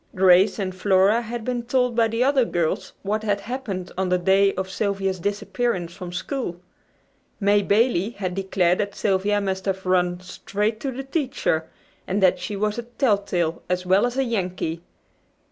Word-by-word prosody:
Grace 185 +1 +5
and 190 -3 -2
Flora 195 +4 +3
had 235 0 -6
been 245 -1 -1
told 250 0 0
by 230 -1 +4
the 230 +2 0
other 270 -1 +3
girls 170 -8 -1
what 210 +2 -1
had 205 -2 -1
happened 210 -6 -5
on 190 -1 0
the 180 - +3
day 195 +2 +4
of 190 0 -2
Sylvia's 195 -1 -1
disappearance 200 -1 -2
from 180 -2 -8
school. 180 -1 -4 0.8
May 205 0 +3
Bailey 210 -1 +2
had 195 -6 -4
declared 185 -2 +1
that 200 -1 -2
Sylvia 205 +1 +1
must 190 -1 -2
have 190 -1 -2
"run 180 -1 +1
straight 205 +4 -3
to 275 - -3
the 265 +2 -5
teacher," 270 - -1 0.4
and 195 +2 0
that 180 -1 +4
she 205 +3 -4
was 210 +3 -1
a - - -4
telltale 200 - 0
as 180 0 -1
well 190 +6 +4
as 245 +1 -5
a 270 - +3
"Yankee." 185 -8 -2
200 Hz, 175 wpm, -23 LUFS, 185-230 Hz, 0.8 s, Grace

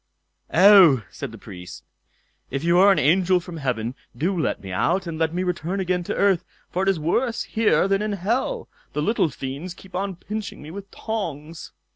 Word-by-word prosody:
"Oh!" 180 - +7
said - - -6
the - - -10
Priest, 90 -1 -10 0.7
"if 135 +2 -3
you 170 +1 +4
are 200 +2 +7
an 195 - +3
angel 180 +5 +3
from 175 -1 -9
heaven, 125 -5 -2 0.2
do 180 +6 0
let 165 - -1
me 95 -1 -8
out, 185 - +1
and 165 -2 -5
let 160 -1 +1
me 180 +2 -1
return 180 +1 -2
again 180 -1 0
to - - -3
earth, 195 -4 +3 0.3
for 185 - -1
it 195 - +2
is 190 -4 +1
worse 230 +10 0
here 220 -3 +2
than 195 0 +1
in 210 -1 -1
hell. 235 - -1 0.3
The 150 - -1
little 195 -2 +2
fiends 145 +7 -6
keep 190 0 -16
on 195 0 -2
pinching 210 +4 -6
me 150 +2 -10
with 200 +2 -8
tongs." 165 -8 -5
180 Hz, 195 wpm, -23 LUFS, 155-195 Hz, 0.7 s, Oh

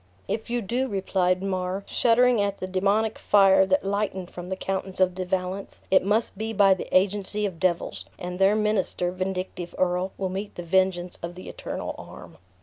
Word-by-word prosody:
"If 220 +2 -3
you 240 -1 -1
do," 245 +7 -1
replied 190 -3 0
Mar, 185 0 -2
shuddering 245 -1 +3
at 200 0 -1
the - - -3
demoniac 200 +4 +1
fire 195 -2 +5
that 190 0 +2
lightened 195 -2 -2
from 175 0 -8
the 190 - -1
countenance 190 0 -3
of 185 -1 +3
De 185 0 -3
Valence, 185 +1 -3
"it 190 - +5
must 210 +4 +1
be 220 +2 -3
by 195 -2 +6
the 185 - -5
agency 205 +2 +1
of 180 -5 -4
devils; 180 -2 -1
and 180 +1 -6
their 195 +2 +5
minister, 210 -4 0
vindictive 185 -1 -4
earl, 180 +1 +1
will 190 -1 -2
meet 195 +3 -5
the 175 - -6
vengeance 180 0 +1
of 170 +1 -6
the 185 - -10
Eternal - - -5
arm." - - -11
190 Hz, 185 wpm, -25 LUFS, 185-205 Hz, -, by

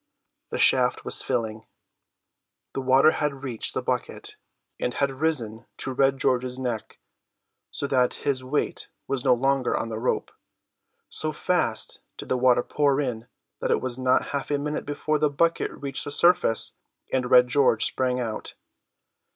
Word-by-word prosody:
The - - -3
shaft - - +3
was - - +1
filling, 110 -1 -3 1.1
the 135 - -3
water 130 +4 +5
had 145 -3 -3
reached 120 -5 -1
the - - -2
bucket, - - -3 0.4
and 125 - -2
had 140 -1 +1
risen 130 -6 -2
to 130 - -2
Red 135 +1 +2
George's 130 -1 0
neck, 120 -4 -4 0.7
so - - -4
that 130 -3 +2
his 135 -2 -2
weight 135 +3 -2 0.2
was 135 -2 -2
no 125 - +4
longer 135 0 +1
on 115 - -3
the 110 -1 -4
rope. 125 - -1 0.8
So 155 - -3
fast 150 -8 0 0.2
did - - -8
the - - +2
water 125 -1 +4
pour 145 -2 +1
in 120 -5 -3 0.3
that - - -2
it - - +3
was 130 0 -4
not 130 0 +2
half 140 -1 -3
a 145 - +1
minute 150 +1 -4
before 150 +1 -1
the 150 0 +3
bucket 165 +4 +1
reached 140 0 -6
the - - -4
surface, 160 -6 +3 0.4
and 125 -2 0
Red 125 0 +7
George 125 -4 +3
sprang 125 -1 +1
out. 115 -3 -5
130 Hz, 160 wpm, -25 LUFS, 125-145 Hz, 1.1 s, Red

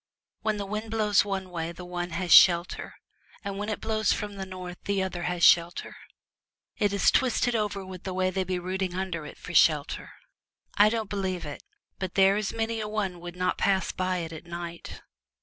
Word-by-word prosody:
When 215 -1 0
the 200 - -3
wind 215 +2 -4
blows 215 -3 +3
one 190 -2 -4
way 165 -1 -3
the 180 +1 -9
one 175 0 -4
has 175 +1 -3
shelter, 175 -1 +5 0.5
and 200 -1 -4
when 210 +1 -3
it 215 - -2
blows 215 -1 +1
from 205 -1 -2
the 195 -1 -6
north 180 -1 -8
the 200 -1 +1
other 180 -2 -4
has 175 -1 -2
shelter. 170 +1 +4 0.8
It 205 -1 +1
is 200 -2 +3
twisted 245 -2 +2
over 205 -3 -1
with 185 -1 -9
the 190 - -5
way 185 0 +1
they 190 +1 -1
be 185 0 -2
rooting 185 0 -3
under 180 -5 -3
it - - -11
for 180 - -9
shelter. 150 -3 +3 0.7
I 205 +1 +6
don't 225 -1 -2
believe 190 -4 -3
it, 145 -1 -7 0.4
but 185 -2 -4
there 195 0 +5
is 210 -1 -1
many 225 0 -2
a 215 - -3
one 200 -4 -2
would 175 0 -8
not 180 0 -1
pass 190 -2 +2
by 185 0 -1
it 165 - -8
at 160 +2 -10
night.' 170 0 -7
190 Hz, 200 wpm, -27 LUFS, 175-205 Hz, 0.8 s, I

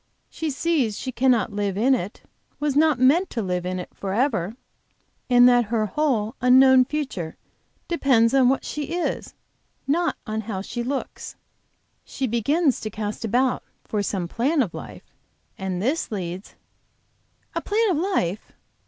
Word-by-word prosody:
She 320 -1 -3
see 295 -3 +1
she 235 +5 -5
cannot 240 -4 +2
live 200 -2 -2
in 255 +6 +4
it, 205 -5 -3 0.4
was 295 -2 0
not 305 -2 +4
meant 290 +9 +4
to 230 - -3
live 180 -1 -2
in 185 0 -2
it 180 - -7
forever, 210 -1 -1 0.7
and 245 0 +7
that 245 -1 +4
her 220 0 0
whole 230 -2 0
unknown 260 0 +6
future 260 - -4 0.5
depends 260 -9 +3
on 260 -2 +5
what 270 - 0
she 300 +2 -4
is, 350 - -3 0.5
not 330 +2 +1
on 220 -1 -3
how 205 -3 -4
she 240 +3 -4
looks. 265 +3 -4 0.7
She 270 - -4
begins 265 +6 +1
to 215 - -4
cast 210 +1 -5
about 245 +4 +1 0.2
for 210 - -2
some 190 -3 -2
plan 270 - +1
of 185 - -6
life, - - -10 0.4
and 190 -2 -3
this 265 - -1
leads 185 -1 -5 0.5
" - - -43
"A - - -2
plan 430 0 +1
of 335 - +1
life?" 260 - -1
245 Hz, 155 wpm, -24 LUFS, 205-280 Hz, 0.7 s, and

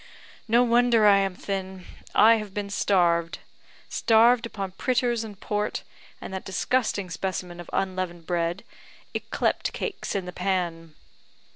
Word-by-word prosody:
No 235 +2 +5
wonder 235 -2 +4
I 200 -1 +7
am 195 -2 -1
thin; 190 -1 -5 0.3
I 225 +2 +7
have 210 -3 -7
been 205 -1 -3
starved 170 -4 +2 0.5
starved 230 +1 +4
upon 195 -4 -5
pritters 240 +2 0
and 205 -3 -9
port, 210 0 -2 0.4
and - - -8
that 190 - -4
disgusting 200 -1 -1
specimen 180 -1 -4
of 175 - -9
unleavened 185 -3 -2
bread, 175 +2 -1 0.5
yclept - - -1
cakes 425 - -4
in 195 -2 -1
the 180 - -7
pan. 175 -4 -2
195 Hz, 135 wpm, -26 LUFS, 180-225 Hz, 0.5 s, I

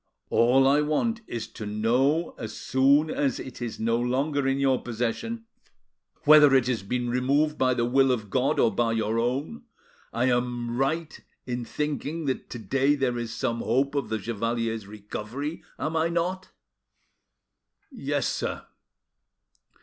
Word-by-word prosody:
All 130 +3 +4
I 145 +2 +4
want 220 +11 0
is, 115 -2 -4
to 105 - -7
know 125 +10 +1
as 110 - -6
soon 140 +4 +3
as 135 -4 0
it 130 -1 -8
is 120 -2 -4
no 115 +1 +1
longer 135 +3 0
in 135 0 +1
your 135 -2 +2
possession, 125 - -3 0.8
whether 150 -2 +7
it 130 -2 +4
has 120 -4 -1
been 120 +5 -2
removed 140 +5 +2
by 130 -1 +3
the 120 - +1
will 135 +2 +3
of 110 -5 -2
God 135 +4 +1
or 115 - +3
by 115 -1 +1
your 110 0 0
own, 135 - -2 0.5
I 120 +2 0
am 120 -1 0
right 155 +5 -1 0.3
in 125 -1 -3
thinking 150 +3 -3
that 130 -2 -3
to - - -6
day 135 +7 +1
there 125 -4 0
is 115 -1 -4
some 115 0 -2
hope 135 +5 +1
of 140 -6 -2
the 110 - 0
chevalier's 115 -1 -2
recovery, 110 +8 -6 0.2
am 160 - -3
I 165 +1 +2
not?" 180 +2 -2 1.4
"Yes, - - -2
Sir." - - -3
130 Hz, 155 wpm, -26 LUFS, 115-145 Hz, 1.4 s, whether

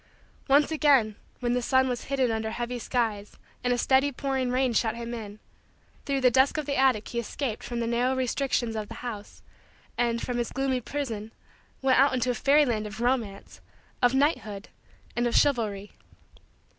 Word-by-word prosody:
Once 285 +2 +4
again, 275 -9 +3 0.3
when 240 -1 0
the 250 - +1
sun 260 +1 +3
was 245 -2 -3
hidden 265 -3 +1
under 220 0 -2
heavy 240 +2 -4
skies 220 -4 -2 0.3
and 245 - +1
a 245 - +2
steady 270 +3 +3
pouring 265 -1 -2
rain 255 0 +1
shut 225 0 +1
him 235 0 -6
in, 210 -3 -7 0.7
through 275 -1 +1
the 255 -1 +4
dusk 265 +4 +3
of 305 - -2
the 280 0 -2
attic 260 -5 +2
he 235 - -2
escaped 235 0 -4
from 240 -1 -5
the 235 - -1
narrow 245 +3 +1
restrictions 255 -2 -1
of 215 -1 -3
the 230 - -9
house, 210 -4 -7 0.6
and, 235 -1 +1
from 245 0 -3
his 240 - -2
gloomy 265 -1 -1
prison, 225 -6 -4 0.5
went 260 -1 +4
out 275 -1 +4
into 250 0 +1
a - - -1
fairyland 250 -6 +2
of 215 +1 -9
romance, 235 -5 -2 0.4
of 245 +1 +4
knighthood, 225 -8 0 0.5
and 240 0 +1
of 235 - -1
chivalry. 215 -8 +1
245 Hz, 180 wpm, -27 LUFS, 225-265 Hz, 0.7 s, Once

